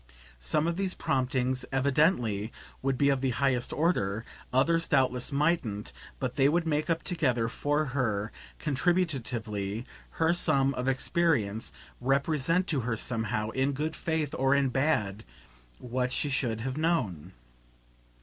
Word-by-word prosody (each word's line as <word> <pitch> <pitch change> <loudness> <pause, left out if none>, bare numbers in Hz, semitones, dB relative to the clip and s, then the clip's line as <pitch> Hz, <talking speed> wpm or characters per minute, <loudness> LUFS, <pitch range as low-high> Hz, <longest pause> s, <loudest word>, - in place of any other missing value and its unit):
Some 60 - +1
of 170 0 -1
these 190 -1 -1
promptings, 130 -1 0
evidently, 130 - +2 0.3
would 135 -1 0
be 140 +1 +3
of 135 -2 +1
the 135 - +1
highest 130 -2 +1
order 115 - 0 0.3
others 165 +6 +2
doubtless 125 0 +1
mightn't; 140 -8 0 0.3
but 130 0 -3
they 135 0 +5
would 170 +2 +1
make 155 +1 0
up 165 0 0
together, 130 -10 0
for 145 +5 0
her, 110 -5 0 0.3
contributively, 125 - -1 0.3
her 165 +1 +2
sum 140 -6 +2
of 125 0 -3
experience, 130 - +1 0.3
represent 140 +6 +1
to 150 -6 +1
her 115 -2 -1
somehow, 110 -1 -1
in 135 +3 0
good 155 +4 -2
faith 160 -3 -1
or 135 +1 +3
in 140 -1 +2
bad, 115 -7 0 0.5
what 125 +1 -2
she 145 - -1
should 120 -5 -1
have 130 +3 -3
KNOWN. 100 - -1
135 Hz, 140 wpm, -29 LUFS, 115-155 Hz, 0.5 s, they